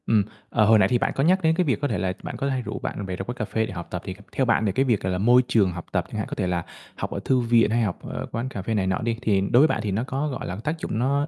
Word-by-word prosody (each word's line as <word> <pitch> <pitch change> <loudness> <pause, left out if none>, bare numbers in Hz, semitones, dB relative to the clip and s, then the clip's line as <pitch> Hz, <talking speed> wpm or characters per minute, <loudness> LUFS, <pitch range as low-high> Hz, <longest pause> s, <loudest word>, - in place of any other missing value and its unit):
Ừm, 110 -3 +4 0.3
ờ, 110 - +3
hồi 110 0 +6
nãy 95 - +5
thì 120 - +2
bạn - - 0
có 135 - +1
nhắc 185 +4 +4
đến 160 0 +4
cái 180 - +2
việc 140 -4 0
có 145 - +1
thể 110 - -1
là 95 +1 -1
bạn - - -5
có 140 - -1
hay 130 -2 -1
rủ - - -5
bạn 100 - -4
bè 95 -1 -4
ra 95 - -4
quán 120 +5 -5
cà 110 - -2
phê 110 +2 -1
để - - -7
học 85 -1 -6
tập. 90 - -3
Thì 95 - -5 0.2
theo 130 - +1
bạn 115 -2 +2
thì 100 - +2
cái 135 +8 +1
việc, 115 -6 +2
gọi 95 - -1
là, 90 - 0
môi 120 +6 +5
trường 100 -5 +3
học 85 -1 -7
tập - - 0
chẳng - - -5
hạn, - - -2
có - - -5
thể 90 - -1
là 85 -2 -1 0.3
học - - -4
ở - - -3
thư 130 -1 +3
viện 115 -2 +3
hay 120 +1 +2
học 100 -6 -1
ở - - -4
quán 120 +3 -3
cà 100 - -5
phê 110 +4 -2
này 100 -3 +1
nọ 95 - +1
đi, 115 0 -1
thì 100 -5 +2
đối 110 +5 +3
với 155 - +6
bạn - - -1
thì 105 - -1
nó 105 +5 0
có, 135 +3 -2
gọi 135 - -4
là, 90 - -4
tác 155 +2 -2
dụng 110 - -3
nó 140 +4 +1
115 Hz, 365 wpm, -24 LUFS, 95-130 Hz, 0.3 s, hồi